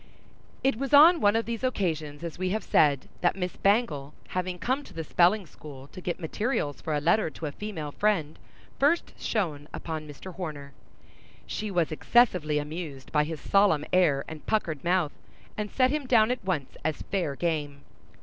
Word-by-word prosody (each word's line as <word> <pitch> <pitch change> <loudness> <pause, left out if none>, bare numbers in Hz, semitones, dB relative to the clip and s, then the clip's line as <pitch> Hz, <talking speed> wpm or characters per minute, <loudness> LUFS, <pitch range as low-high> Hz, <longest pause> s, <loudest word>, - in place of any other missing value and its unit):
It 270 -3 +2
was 275 +2 +2
on 325 +3 +8
one 205 +1 +4
of 225 - +1
these 235 +1 -4
occasions, 160 - -2
as 170 0 -6
we 185 0 0
have 215 +1 -1
said, 145 -6 +3
that 175 - +2
Miss 180 -2 -3
Bangle, 195 - +1
having 185 0 -2
come 260 +11 -1
to - - -15
the 165 - -3
spelling 180 +6 +3
school 140 -3 -11
to 185 - -10
get 175 -1 -3
materials 170 - -2
for 155 - -2
a - - +1
letter 170 +5 +2
to 160 - -8
a 145 - -2
female 160 -5 -5
friend, 170 -5 0 0.4
first 300 +5 +2
shone 155 -9 -2
upon 155 -2 -5
Mr. 150 +6 -9
Horner. 150 -6 -6 0.7
She 215 - -4
was 175 -5 0
excessively 165 -4 +3
amused 150 -2 -5
by 150 -1 +3
his 160 0 -5
solemn 195 -7 +3
air 160 -7 +3
and 160 -1 -8
puckered 165 -10 -1
mouth, 175 -3 +1 0.4
and 210 0 -3
set 255 +3 +2
him 295 -3 -2
down 230 -2 +5
at 250 - -3
once 170 -8 -3
as 155 0 -2
fair 175 -8 -2
game. 145 -3 -2
175 Hz, 180 wpm, -27 LUFS, 150-210 Hz, 0.7 s, on